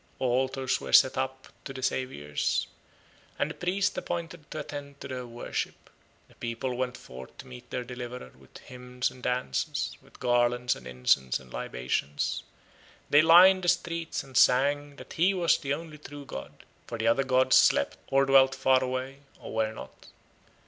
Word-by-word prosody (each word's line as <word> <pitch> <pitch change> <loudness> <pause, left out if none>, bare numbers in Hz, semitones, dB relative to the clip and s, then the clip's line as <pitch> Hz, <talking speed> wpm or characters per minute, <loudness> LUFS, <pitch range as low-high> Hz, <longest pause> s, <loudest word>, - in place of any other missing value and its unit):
Altars 130 +1 0
were - - -6
set 130 - +7
up 130 0 -4
to 135 - -7
the 130 -1 -7
Saviours, 75 - -1 0.7
and - - 0
a - - -6
priest 185 +2 -1
appointed 170 -3 -6
to 155 - -4
attend 140 -1 -8
to - - -7
their 125 -2 -5
worship. 120 0 -5 0.4
The - - -22
people 120 +2 -4
went 125 -1 -2
forth 65 +1 -12
to - - -10
meet 60 -1 -12
their 125 - -3
deliverer 125 - -8
with - - -16
hymns 125 +1 -4
and 130 - -15
dances, 125 - -2
with - - -20
garlands 120 0 +2
and - - -11
incense 65 +1 +1
and 65 -2 -16
libations; 65 +3 -2 0.7
they 145 - +7
lined 180 +4 +7
the - - -2
streets 170 -2 -1
and 135 -1 -15
sang 145 +4 +3
that - - -11
he 185 +4 +2
was 175 -2 +3
the 140 0 -1
only 155 -1 -10
true 145 -1 -10
god, 70 - -9 0.2
for 115 - -5
the 110 - -2
other 115 +4 +3
gods 130 0 +3
slept, 70 - +4
or 135 0 +3
dwelt 135 0 +5
far 130 -1 +3
away, 130 +2 -4 0.2
or - - -9
were 110 -1 0
not. 110 - -11
130 Hz, 170 wpm, -28 LUFS, 120-145 Hz, 0.7 s, set